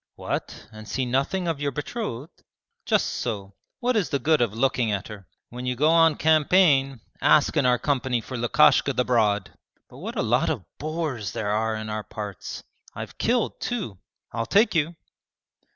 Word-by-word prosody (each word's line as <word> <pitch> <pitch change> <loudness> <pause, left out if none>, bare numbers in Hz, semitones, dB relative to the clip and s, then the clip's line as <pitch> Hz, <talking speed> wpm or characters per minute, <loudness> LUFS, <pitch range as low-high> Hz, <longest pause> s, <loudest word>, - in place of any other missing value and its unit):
'What, - - -5
and 110 -1 -11
see 130 - -1
nothing 140 +9 0
of 165 -4 -1
your 145 - +1
betrothed?' 150 - -6 0.4
'Just - - +3
so 100 -4 -4 0.3
what 250 0 +1
is 205 -5 +1
the 140 - +1
good 155 0 +2
of 120 -4 +2
looking 120 0 +1
at 100 -1 -2
her? 100 -4 -10 0.2
When 125 +1 -6
you 125 - 0
go 150 +5 +3
on 165 -2 +5
campaign 150 -5 +3 0.2
ask 150 +1 +4
in 140 -4 +3
our 125 0 +4
company 130 -2 0
for 130 +3 -8
Lukashka 140 +3 +4
the 125 -1 0
Broad. 105 -5 +1 0.4
But - - -13
what - - -6
a - - 0
lot - - +2
of - - -3
boars 155 - -3
there 105 -1 -2
are 110 +1 0
in 110 0 -5
our 110 0 -3
parts! 105 -4 -7 0.3
I've - - -8
killed 240 -1 0
two. 200 - -3 0.3
I'll 115 0 -3
take 215 - +4
you.' 165 0 0
130 Hz, 180 wpm, -25 LUFS, 110-155 Hz, 0.4 s, on